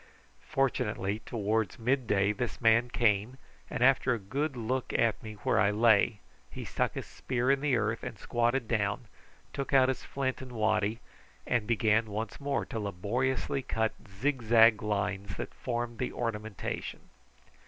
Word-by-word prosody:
Fortunately 105 -6 0
towards 110 +1 -1
mid 125 +1 0
day 100 -1 +3
this 125 +3 -3
man 120 +1 +4
came, 115 +1 +1 0.3
and 120 - -1
after 130 -1 +4
a - - -3
good 130 +8 -3
look 125 +3 -2
at 115 -2 +2
me 110 -1 -8
where - - +2
I 100 +1 +4
lay 110 0 +3 0.3
he - - -7
stuck - - -1
his - - -4
spear 125 +1 -1
in 140 0 +2
the 145 -3 +2
earth, 110 +1 -1
squatted 120 +1 0
down, 105 0 0 0.5
took 140 0 -4
out 130 -1 +6
his 130 - -2
flint 130 -2 -2
and 130 -1 -9
waddy, 110 0 +1 0.4
and 120 -4 0
began 110 -1 +2
once 105 +1 -4
more 140 -1 -1
to 115 - -5
laboriously 120 +8 -1
cut 110 -3 -1
the - - -19
zigzag 115 -1 +4
lines 100 -2 -2
that - - -5
formed 120 -1 -3
the 125 - -1
ornamentation. 110 -3 -4
115 Hz, 155 wpm, -30 LUFS, 105-125 Hz, 0.5 s, out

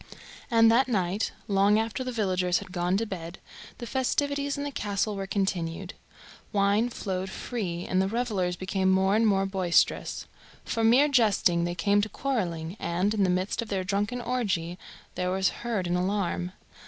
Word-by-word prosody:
And 225 -2 +6
that 255 +3 +4
night, 195 -3 0 0.2
long 200 0 +4
after 225 +3 -1
the 255 - -3
villagers 185 -6 +1
had - - -7
gone 180 +1 0
to 225 - -1
bed, 175 -4 -6 0.4
the 240 - -6
festivities 280 +3 -1
in 285 - -3
the 285 - -3
castle 205 -3 -1
were 195 -1 -4
continued. 185 -2 -2 0.6
Wine 205 +3 +2
flowed 190 -5 -4
free 185 -5 -4
and 185 0 +2
the 190 - +1
revellers 205 -5 -1
became 190 +1 0
more 190 +1 +3
and 225 +1 +3
more 195 -2 +2
boisterous. 190 -3 +1 0.4
From 225 -1 +2
mere 265 +5 +6
jesting 205 -10 +3
they 175 0 -3
came 200 +4 +2
to 215 - -2
quarrelling, 180 -11 -2
and, 180 +5 0
in 210 -2 +1
the 185 - +2
midst 185 +5 0
of 230 - -6
their 190 -2 -1
drunken 205 +6 -1
orgy, 195 -9 -2 0.3
there 180 0 -2
was 190 +1 +2
heard 225 -6 -2
an 175 0 0
alarm. 180 -1 -1
195 Hz, 175 wpm, -27 LUFS, 180-225 Hz, 0.6 s, And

